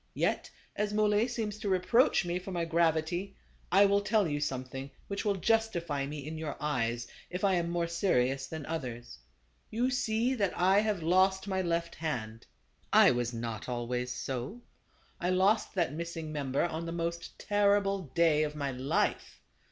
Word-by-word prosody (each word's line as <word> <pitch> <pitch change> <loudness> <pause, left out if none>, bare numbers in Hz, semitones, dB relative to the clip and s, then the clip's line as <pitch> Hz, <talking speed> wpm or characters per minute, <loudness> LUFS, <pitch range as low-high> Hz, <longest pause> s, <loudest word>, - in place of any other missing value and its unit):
Yet - - 0 0.3
as 210 0 -1
Muley 210 +1 +3
seems 220 -4 -3
to 210 -2 -2
reproach 190 +3 +3
me 175 +1 -1
for 185 +1 -8
my 170 -2 -1
gravity, 165 +3 0 0.4
I 195 +3 +7
will 200 0 +3
tell 210 -2 +2
you 145 -1 -1
something 135 -1 -4 0.2
which 200 0 -3
will 205 -2 +1
justify 175 -9 0
me 145 -1 -6
in 155 +1 -5
your 155 -2 -4
eyes, 120 -5 -1 0.2
if 180 +2 -5
I 195 -1 +4
am 170 -2 0
more 170 0 0
serious 135 -7 +1
than 160 -2 -6
others. 125 -7 -5 0.5
You 245 +4 0
see 235 0 +1
that 200 -7 -1
I 190 +3 +4
have 210 -5 0
lost 190 +3 +3
my 190 -1 0
left 170 -1 -1
hand. 115 -8 -4 0.4
I - - +7
was 120 -1 -1
not 115 -1 -5
always 125 +1 -2
so; 135 - -5 0.6
I 175 - 0
lost 190 +5 +2
that 170 -7 +1
missing 165 -1 -5
member 140 -3 -1
on 170 0 -4
the - - -3
most 170 0 -4
terrible 200 -1 +2
day 165 -3 +4
of 150 -1 -1
my 140 -2 -2
life. 130 +2 -1
170 Hz, 170 wpm, -31 LUFS, 145-200 Hz, 0.6 s, I